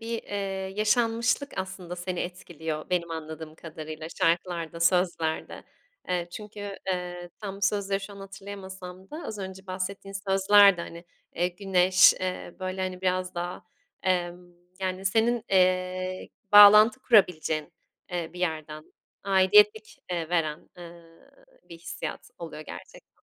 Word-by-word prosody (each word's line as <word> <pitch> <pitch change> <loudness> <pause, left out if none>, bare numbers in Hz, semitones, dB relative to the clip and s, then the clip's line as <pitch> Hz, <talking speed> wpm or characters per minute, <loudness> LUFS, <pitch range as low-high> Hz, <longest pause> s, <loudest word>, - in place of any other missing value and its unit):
bir, 230 0 -4
eee, 195 -1 -4
yaşanmışlık 230 +5 +1
aslında 185 -2 -5
seni 180 0 -4
etkiliyor, 160 -4 -5
benim 170 -2 0
anladığım 160 -1 -7
kadarıyla, 155 -1 -8
şarkılarda, 170 -2 0
sözlerde. 170 -2 0 0.4
Eee, 175 -1 -1
çünkü, 205 0 -7
eee, 180 -1 -4
tam 200 -2 -5
bu 200 - -14
sözleri 195 0 +1
şu 200 +1 -8
an - - -12
hatırlayamasam 190 -1 -9
da 310 +3 -7
az 215 - -6
önce 190 0 -7
bahsettiğin 195 +1 -5 0.2
sözler 200 0 +6
de, - - -5
hani, 170 +1 -9 0.3
eee, 175 +1 +1
güneş, 185 0 +5
eee, 185 -1 -4
böyle, 185 0 -3
hani, 185 -1 -4
biraz 185 0 -1
daha, 175 +1 -4 0.4
emm, 175 -1 -1 0.3
yani, 185 0 -3
senin, 225 +4 +2
eee, 185 0 +1 0.2
bağlantı 210 +4 +9
kurabileceğin, 175 - +2 0.4
eee, 170 -2 -3
bir 180 - -9
yerden 155 -3 -4 0.3
aidiyetlik, 210 +3 +4
eee, 170 -3 -2
veren, 160 -3 -1
ııı, 170 -1 -14 0.4
bir 170 - -11
hissiyat 170 - -7
oluyor 165 -3 -7
gerçekten. - - -12
185 Hz, 130 wpm, -27 LUFS, 175-195 Hz, 0.4 s, bağlantı